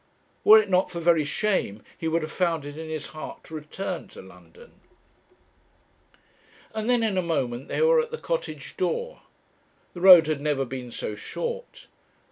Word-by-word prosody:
Were 215 - +9
it 215 - -1
not 185 -1 +2
for 170 - -6
very 165 -2 +3
shame, 145 - -1
he 165 - -4
would 165 0 0
have 155 - -5
found 165 -5 0
it 145 0 -8
in 160 0 -7
his 155 -2 -4
heart 155 - -9
to - - -14
return 155 +5 -5
to - - -12
London. 475 +1 -17 2.0
And 220 +1 -3
then 245 -2 +3
in 205 -4 +1
a - - +2
moment 135 -7 -2
they - - 0
were 480 0 +5
at 470 - -6
the 470 - -5
Cottage - - -4
door. 485 +1 -2 0.7
The 175 - -8
road 180 -3 +9
had 155 -2 -2
never 145 -2 0
been 125 -1 -7
so 110 - -5
short. 485 - -6
170 Hz, 175 wpm, -25 LUFS, 150-220 Hz, 2.0 s, Were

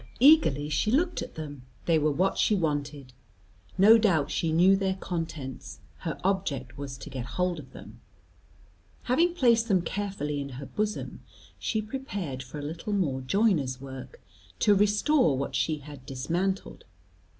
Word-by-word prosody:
Eagerly 245 - +5
she 150 +8 0
looked 335 +9 +1
at - - -7
them; 145 -4 -7 0.2
they 165 -2 +3
were 155 0 +2
what 185 +7 +1
she 215 - +3
wanted. 145 -6 -2 0.6
No 215 +4 +8
doubt 165 -10 +2
she 165 - 0
knew 180 +4 +5
their 190 -1 0
contents; 165 -8 -5 0.2
her - - -4
object 155 -10 -1
was 140 -2 -6
to - - -9
get 130 -2 -4
hold 180 -2 0
of 135 - -12
them. - - -12 1.0
Having 335 +8 +2
placed 235 -7 +3
them 190 -5 +2
carefully 175 -7 -3
in 140 - -5
her 140 - -6
bosom, 210 +7 -3 0.4
she 220 -1 -1
prepared 205 - -5
for 130 +4 -9
a 145 - -5
little 165 +7 -4
more 145 -10 0
joiner's 140 - +1
work, 135 - -9 0.4
to 210 - +4
restore 210 - +3
what 140 - -3
she 155 -1 0
had 145 -2 -11
dismantled. 175 +9 -2
170 Hz, 155 wpm, -28 LUFS, 140-205 Hz, 1.0 s, No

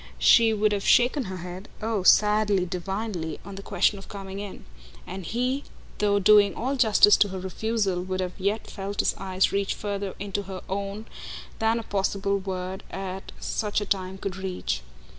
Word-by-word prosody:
She 230 -1 +6
would 215 -1 +2
have 200 -1 -1
shaken 250 +2 +4
her 190 -1 -5
head 180 +3 -8
oh 220 -2 -1
sadly, 210 -1 +4
divinely 180 -2 -4
on 200 - -8
the 195 - -7
question 200 0 +1
of 195 - -12
coming 195 -1 -7
in; 205 -2 -8 0.4
and 190 - -6
he, 250 - -1 0.4
though 205 -1 +3
doing 205 0 +5
all 265 +4 -1
justice 215 -4 +6
to 205 - +4
her 190 -1 -5
refusal, 195 0 -1
would 185 +1 -3
have 180 -1 -2
yet 200 +3 0
felt 200 0 -3
his - - +1
eyes 190 -1 +1
reach 200 0 0
further 200 -2 -4
into 200 0 -3
her 185 -1 -6
own 200 +2 -4 0.5
than 225 +1 +2
a 230 - -3
possible 200 0 0
word 190 0 -5
at 190 0 -6
such 210 -2 -1
a 205 - -3
time 190 -1 -2
could 190 -1 -4
reach. 180 - -3
200 Hz, 180 wpm, -26 LUFS, 190-210 Hz, 0.5 s, She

